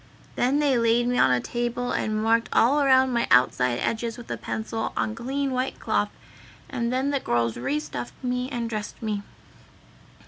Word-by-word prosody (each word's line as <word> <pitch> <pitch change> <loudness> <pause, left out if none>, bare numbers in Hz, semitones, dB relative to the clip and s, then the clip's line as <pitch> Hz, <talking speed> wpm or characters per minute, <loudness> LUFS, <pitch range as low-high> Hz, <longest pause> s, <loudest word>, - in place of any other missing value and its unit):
Then 255 +4 +2
they 285 -4 +3
laid 230 +1 +3
me 245 0 +1
on - - +5
a 125 -1 +3
table 240 - -2
and 215 0 -1
marked 230 +1 +2
all 275 +6 +4
around 260 -2 +4
my 235 -1 +1
outside 125 0 +3
edges 230 0 -2
with 240 - -9
a - - -1
pencil 220 0 -4
on 220 - 0
clean 270 +4 -2
white 255 +1 -2
cloth, - - 0 0.6
and 235 -3 -2
then 265 +3 0
the 280 - +1
girls 115 - 0
re 135 +5 -1
stuffed 120 -5 -6
me 250 0 -1
and 240 -4 -3
dressed 215 -2 -5
me. 210 -2 -1
235 Hz, 180 wpm, -25 LUFS, 215-255 Hz, 0.6 s, on